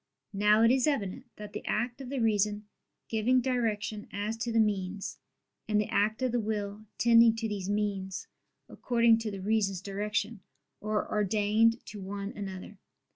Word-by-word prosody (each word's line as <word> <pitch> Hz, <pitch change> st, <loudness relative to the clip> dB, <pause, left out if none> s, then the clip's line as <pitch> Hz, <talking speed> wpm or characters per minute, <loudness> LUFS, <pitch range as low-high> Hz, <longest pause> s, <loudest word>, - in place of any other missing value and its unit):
Now 210 Hz, +2 st, +4 dB
it 230 Hz, -, +6 dB
is 260 Hz, +1 st, +3 dB
evident 240 Hz, -4 st, -2 dB
that 210 Hz, -1 st, -9 dB
the -, -, -5 dB
act 240 Hz, +4 st, -1 dB
of 260 Hz, -, -7 dB
the 275 Hz, -, -3 dB
reason 210 Hz, -2 st, +1 dB, 0.4 s
giving 230 Hz, +3 st, +2 dB
direction 225 Hz, -4 st, -1 dB
as 205 Hz, +2 st, -2 dB
to 235 Hz, +1 st, -2 dB
the 225 Hz, -, +2 dB
means, 200 Hz, -2 st, -1 dB, 0.5 s
and 210 Hz, -1 st, +2 dB
the 210 Hz, -, -1 dB
act 215 Hz, +4 st, +1 dB
of 255 Hz, -, +1 dB
the 240 Hz, -, +1 dB
will 210 Hz, -1 st, -3 dB
tending 230 Hz, -1 st, +6 dB
to 225 Hz, 0 st, -2 dB
these 200 Hz, -3 st, -4 dB
means 200 Hz, -2 st, -2 dB, 0.4 s
according 235 Hz, -2 st, +3 dB
to 225 Hz, -1 st, -3 dB
the 195 Hz, -2 st, -6 dB
reason's 200 Hz, -3 st, +1 dB
direction, 210 Hz, +3 st, -2 dB, 0.4 s
are 215 Hz, 0 st, -1 dB
ordained 215 Hz, +3 st, +2 dB
to 205 Hz, -, -8 dB
one 200 Hz, +1 st, -5 dB
another. 195 Hz, 0 st, -7 dB
210 Hz, 165 wpm, -30 LUFS, 205-230 Hz, 0.5 s, it